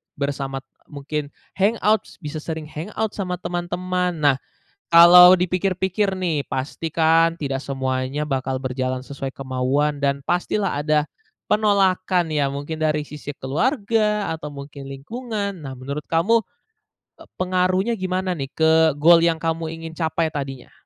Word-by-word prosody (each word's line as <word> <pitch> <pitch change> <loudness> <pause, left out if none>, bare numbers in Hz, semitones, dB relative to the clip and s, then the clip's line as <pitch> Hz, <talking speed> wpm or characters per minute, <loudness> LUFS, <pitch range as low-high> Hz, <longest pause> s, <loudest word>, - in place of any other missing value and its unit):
bersama 135 -1 -3 0.2
mungkin 145 0 -4 0.3
hangout 215 +1 +2
s - - -15
bisa 150 +1 -5
sering 160 0 -5
hangout 205 +7 -4
sama 180 -3 -3
teman-teman. 180 0 -2
Nah, 145 -4 +3 0.5
kalau 180 +2 +9
dipikir-pikir 190 +2 0
nih 160 -6 0
pastikan 165 +4 +1
tidak 135 -2 -3
semuanya 130 +2 -2
bakal 135 -1 -2
berjalan 130 -1 -2
sesuai 135 0 -6
kemauan 135 +3 -1
dan 140 0 +1
pastilah 180 -3 0
ada 150 -1 +2 0.4
penolakan 190 -4 +2
ya 145 -3 0
mungkin 155 +3 -4
dari 150 -1 0
sisi 145 0 -7
keluarga, 210 - 0
atau 150 -2 -8
mungkin 140 -1 -9
lingkungan. 200 - -5
Nah 135 - -6
menurut 140 +3 -5
kamu, 210 +8 +3 0.8
eee, - - -14
pengaruhnya 185 +3 +1
gimana 185 0 -1
nih 140 -6 -3
ke 160 0 +3 0.2
goal 165 +3 +6
yang 165 -1 +3
kamu 165 0 -2
ingin 165 0 -8
capai 160 -1 -1
tadinya? 135 -4 -6
160 Hz, 130 wpm, -22 LUFS, 140-185 Hz, 0.8 s, kalau